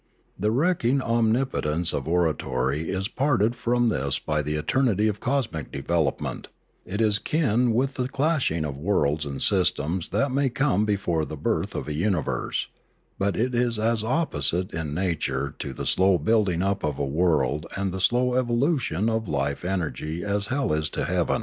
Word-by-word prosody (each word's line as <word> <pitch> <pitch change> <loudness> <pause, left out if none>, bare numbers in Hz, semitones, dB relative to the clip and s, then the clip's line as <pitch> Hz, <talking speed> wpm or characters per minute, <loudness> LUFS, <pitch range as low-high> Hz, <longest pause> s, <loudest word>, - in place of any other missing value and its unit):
The 105 +3 +1
wrecking 140 0 +2
omnipotence 115 - +1
of 70 - -3
oratory 80 -4 0
is 95 +1 -1
parted 120 -3 +1
from 120 0 +1
this 70 -6 0
by 75 0 -1
the 75 +1 -2
eternity 110 - +1
of 105 -1 -1
cosmic 125 - -2
development; 75 0 -1 0.4
it 100 +3 -4
is 105 -2 +2
kin 125 -6 +1
with 130 +4 +1
the 125 -2 -2
clashing 140 - +1
of 70 -2 -4
worlds 75 -4 +1
and 70 -1 -3
systems 80 +5 +1
that 140 -1 +1
may 135 0 +2
come 120 -5 +1
before 95 -6 0
the 75 0 -6
birth - - -1
of - - -4
a 75 - -2
universe; 85 -1 -1 0.5
but 100 0 0
it 125 +3 0
is 120 -1 +2
as 110 0 +1
opposite 95 - 0
in 80 -2 -3
nature 75 -6 -1
to 70 - -4
the 65 - -6
slow 95 0 +4
building 95 0 +1
up 100 0 0
of 75 -2 -1
a 70 - -1
world 75 -1 +1
and 95 -1 -1
the 95 +1 -4
slow 125 +5 +3
evolution 125 - +1
of 115 0 +1
its - - -9
life 70 0 -1
energy 85 -2 -3
as 100 0 0
hell 135 - 0
is 75 0 0
to - - -2
heaven. - - +1
95 Hz, 175 wpm, -25 LUFS, 75-120 Hz, 0.5 s, slow